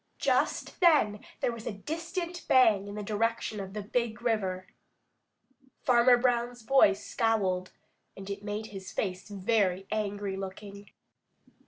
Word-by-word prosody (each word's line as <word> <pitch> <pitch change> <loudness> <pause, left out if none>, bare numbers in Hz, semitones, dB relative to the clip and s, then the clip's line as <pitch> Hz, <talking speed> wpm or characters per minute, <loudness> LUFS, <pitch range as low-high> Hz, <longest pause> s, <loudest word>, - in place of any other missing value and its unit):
Just - - 0
then 295 - +4 0.2
there - - +1
was 230 -1 -8
a - - -1
distant 335 - -5
bang 220 -6 +5
in 205 - -7
the 210 - -4
direction 220 +1 -1
of 190 -1 -6
the 210 - -3
Big 235 +1 -1
River. 190 -6 -1 1.2
Farmer 245 0 +5
Brown's 240 -1 0
boy 265 -5 +5
scowled, 195 -4 -1 0.5
and 195 0 -9
it 200 0 -5
made 210 +1 -4
his 190 -1 -7
face 185 0 -3
very 195 -2 +1
angry 205 -2 -2
looking. 200 +1 -8
210 Hz, 135 wpm, -29 LUFS, 195-240 Hz, 1.2 s, bang